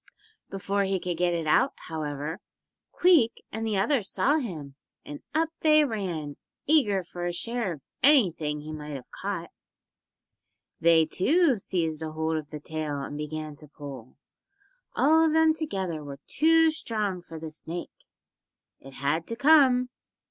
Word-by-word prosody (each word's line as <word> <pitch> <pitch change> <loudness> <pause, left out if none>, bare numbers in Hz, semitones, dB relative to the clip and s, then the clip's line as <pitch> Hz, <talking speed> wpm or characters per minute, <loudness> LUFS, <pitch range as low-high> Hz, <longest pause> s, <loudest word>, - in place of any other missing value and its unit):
Before 195 +1 -1
he 190 -1 0
could 175 -1 -3
get 175 0 +1
it 165 -1 -2
out, 255 - +3
however, 150 0 -4 0.5
Queek 325 -11 +3
and 225 0 -3
the 210 -3 0
others 215 0 +1
saw 290 +3 +2
him, 160 - -6 0.3
and 145 - -8
up 320 0 +2
they 305 -1 +5
ran, 175 - -4 0.3
eager 215 -11 +3
for 175 0 -5
a - - -1
share 230 +1 -2
of 150 - -12 0.2
anything 170 - +3
he 155 +1 -7
might 150 -1 -6
have 130 - -10
caught. - - -4 1.3
They, 165 -1 +5
too, 275 - +2
seized 165 -5 -2
hold 160 0 -2
of 150 -2 -6
the 150 - -7
tail 150 -1 -4
and 140 - -6
began 150 0 -5
to 150 - -12
pull. 140 -4 -10 0.8
All 320 +2 +5
of 320 -1 +2
them 320 0 +5
together 190 - -3
were 140 -1 -8
too 325 +1 +4
strong 210 - -3
for 165 -2 -10
the 160 0 -7
snake. 165 +2 -8 0.7
It 135 0 -13
had 145 +5 -1
to 230 - -3
come. 265 -3 +5
175 Hz, 155 wpm, -27 LUFS, 155-250 Hz, 1.3 s, they